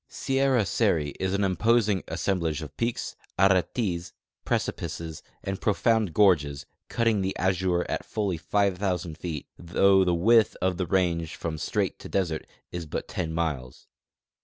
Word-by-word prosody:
Sierra 135 -4 +1
Seri 80 -3 +1
is 95 +1 0
an 100 - +1
imposing 100 +1 +2
assemblage 85 -5 -1
of 75 - -10
peaks, 115 0 -2 0.2
aretes, 95 -2 +1 0.3
precipices, 80 -1 -3 0.2
and 95 0 -4
profound 110 -1 +2
gorges, 75 -9 +3 0.2
cutting 115 -4 +2
the 95 0 -2
azure 90 -1 +1
at - - -2
fully 100 -5 -2
5,000 90 -2 0
feet, 80 -3 -5
though 95 +3 +4
the 90 -2 +2
width 110 +6 +4
of 90 -1 0
the 90 - -1
range 85 -3 0
from 80 -2 -4
strait - - -1
to - - -9
desert 85 -5 -1 0.2
is 85 -2 -5
but - - -4
10 85 -4 -3
miles. 75 -7 -3
90 Hz, 140 wpm, -27 LUFS, 85-100 Hz, 0.3 s, though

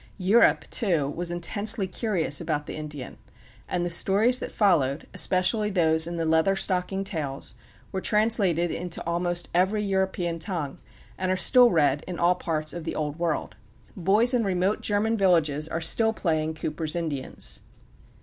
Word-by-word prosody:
Europe, 200 +4 +3
too, 170 - +1
was 170 +4 -3
intensely 200 +5 +1
curious 185 - -1
about 150 0 -2
the - - -7
Indian, 150 -4 -7 0.5
and 175 -1 -1
the - - -2
stories 210 +8 +3
that - - -6
followed, 160 -9 +1
especially 195 +4 +2
those 160 -4 +2
in 170 - -5
the 165 - -1
Leather 160 +4 +2
Stocking 190 0 -1
Tales, 155 -8 -4 0.4
were 190 - -3
translated 200 -7 +2
into 175 -1 -4
almost 175 +1 -1
every 190 +4 +1
European 190 -4 -1
tongue, 160 -6 -4 0.4
and 185 0 -1
are 185 - +1
still 245 +7 +6
read 145 - +2
in 180 -2 -5
all 175 +1 +3
parts 155 -3 -3
of 175 - -6
the 165 - -4
Old 150 +1 -3
World. 170 -3 -2 0.4
Boys 210 +7 +3
in 240 -2 +2
remote 190 +1 0
German 220 +2 0
villages 160 -6 +2
are 160 +1 -3
still 220 +7 +3
playing 160 -5 -1
Cooper's 155 +1 -3
Indians. 155 -6 -4
175 Hz, 160 wpm, -25 LUFS, 160-195 Hz, 0.5 s, still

